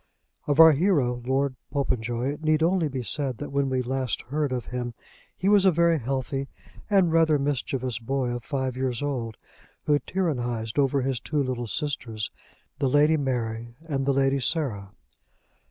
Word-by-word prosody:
Of 145 Hz, +1 st, +1 dB
our 160 Hz, 0 st, +10 dB
hero, 140 Hz, -7 st, +1 dB
Lord 135 Hz, 0 st, +1 dB, 0.2 s
Popenjoy, 125 Hz, -1 st, -1 dB
it 150 Hz, -, -11 dB
need 155 Hz, 0 st, +3 dB
only 175 Hz, -1 st, +2 dB
be 130 Hz, -2 st, -4 dB
said 135 Hz, -1 st, -1 dB
that 145 Hz, -, -6 dB
when 140 Hz, -1 st, +1 dB
we 130 Hz, -1 st, 0 dB
last 130 Hz, 0 st, -2 dB
heard 145 Hz, +2 st, -2 dB
of 125 Hz, -2 st, -2 dB
him 120 Hz, -1 st, -3 dB, 0.4 s
he 185 Hz, -, -1 dB
was 205 Hz, -1 st, +6 dB
a 195 Hz, -, +6 dB
very 170 Hz, -1 st, +3 dB
healthy 135 Hz, +2 st, -2 dB, 0.4 s
and 190 Hz, -5 st, +4 dB
rather 160 Hz, -2 st, +4 dB
mischievous 130 Hz, -4 st, -2 dB
boy 130 Hz, +2 st, -1 dB
of 120 Hz, -1 st, -4 dB
five 130 Hz, -3 st, -2 dB
years 130 Hz, 0 st, -2 dB
old, 120 Hz, -6 st, -3 dB, 0.5 s
who 145 Hz, -1 st, +3 dB
tyrannised 120 Hz, -, -2 dB
over 140 Hz, -1 st, +2 dB
his 130 Hz, -2 st, -1 dB
two 145 Hz, +3 st, -1 dB
little 125 Hz, -2 st, -3 dB
sisters, 115 Hz, -6 st, -3 dB, 0.5 s
the 135 Hz, -2 st, +2 dB
Lady 150 Hz, +4 st, +4 dB
Mary 120 Hz, -4 st, -2 dB
and 135 Hz, -3 st, -1 dB
the 140 Hz, -, +3 dB
Lady 135 Hz, 0 st, +2 dB
Sarah. 125 Hz, -, -1 dB
135 Hz, 170 wpm, -26 LUFS, 125-150 Hz, 0.5 s, our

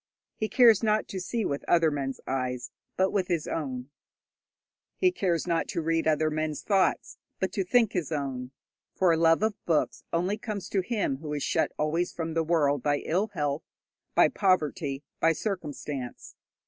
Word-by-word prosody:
He 215 Hz, -, -2 dB
cares 230 Hz, -5 st, +6 dB
not 215 Hz, -1 st, +1 dB
to 190 Hz, -, -4 dB
see 215 Hz, +4 st, -2 dB
with 140 Hz, -, -2 dB
other 165 Hz, -2 st, +4 dB
men's 135 Hz, -2 st, -3 dB
eyes, 125 Hz, -2 st, -2 dB, 0.3 s
but 190 Hz, 0 st, +3 dB
with 195 Hz, -3 st, 0 dB
his 170 Hz, -4 st, -1 dB
own; 130 Hz, -3 st, -4 dB, 1.1 s
he 365 Hz, -1 st, +4 dB
cares 180 Hz, -, 0 dB
not 170 Hz, -2 st, 0 dB
to 170 Hz, -, -2 dB
read 165 Hz, 0 st, +1 dB
other 155 Hz, 0 st, +2 dB
men's 155 Hz, -1 st, -2 dB
thoughts, 195 Hz, -3 st, +1 dB, 0.2 s
but 190 Hz, -, -1 dB
to 195 Hz, -, 0 dB
think 225 Hz, +3 st, +3 dB
his 170 Hz, -4 st, -2 dB
own, 135 Hz, -4 st, -3 dB, 0.5 s
for 185 Hz, -2 st, +4 dB
a -, -, +3 dB
love 165 Hz, +3 st, +4 dB
of 220 Hz, -2 st, -1 dB
books 160 Hz, -3 st, +1 dB
only 185 Hz, +5 st, 0 dB
comes 205 Hz, -4 st, -5 dB
to 195 Hz, -, +1 dB
him 200 Hz, -, -1 dB
who 150 Hz, +1 st, -6 dB
is 145 Hz, -, -2 dB
shut -, -, +1 dB
always 165 Hz, +4 st, 0 dB
from 165 Hz, -1 st, -4 dB
the 165 Hz, -, +2 dB
world 150 Hz, -4 st, +2 dB
by 145 Hz, +2 st, +1 dB
ill 185 Hz, +7 st, +1 dB
health, 145 Hz, -1 st, -1 dB, 0.5 s
by -, -, +7 dB
poverty, 150 Hz, -7 st, 0 dB, 0.2 s
by 165 Hz, 0 st, +4 dB
circumstance. 150 Hz, -, -5 dB
165 Hz, 175 wpm, -28 LUFS, 145-190 Hz, 1.1 s, by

